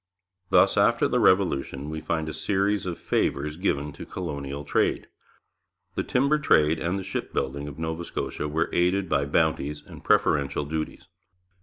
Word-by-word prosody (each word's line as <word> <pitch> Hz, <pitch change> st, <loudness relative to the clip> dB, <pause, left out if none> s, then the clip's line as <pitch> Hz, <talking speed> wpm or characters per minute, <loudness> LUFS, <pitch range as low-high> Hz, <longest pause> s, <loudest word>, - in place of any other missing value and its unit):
Thus -, -, +4 dB
after -, -, +4 dB
the -, -, +1 dB
Revolution 75 Hz, -6 st, +2 dB
we 80 Hz, 0 st, -4 dB
find 80 Hz, 0 st, -2 dB
a 80 Hz, -, -4 dB
series 100 Hz, +4 st, 0 dB
of 85 Hz, -, -3 dB
favours 75 Hz, +2 st, -1 dB
given 75 Hz, -5 st, -1 dB
to -, -, -9 dB
colonial 70 Hz, -5 st, -5 dB
trade. -, -, +1 dB, 0.9 s
The -, -, -1 dB
timber 140 Hz, +4 st, +2 dB
trade 80 Hz, -, +3 dB
and 85 Hz, +4 st, -1 dB
the 95 Hz, -, -4 dB
shipbuilding 70 Hz, -6 st, -3 dB
of 70 Hz, -, -8 dB
Nova 80 Hz, +1 st, -3 dB
Scotia 75 Hz, -, -4 dB
were 80 Hz, +3 st, -1 dB
aided 90 Hz, +2 st, +2 dB
by 70 Hz, -3 st, +1 dB
bounties 75 Hz, -1 st, 0 dB
and -, -, -12 dB
preferential 70 Hz, 0 st, +2 dB
duties. 80 Hz, +1 st, -4 dB
80 Hz, 155 wpm, -26 LUFS, 75-90 Hz, 0.9 s, Thus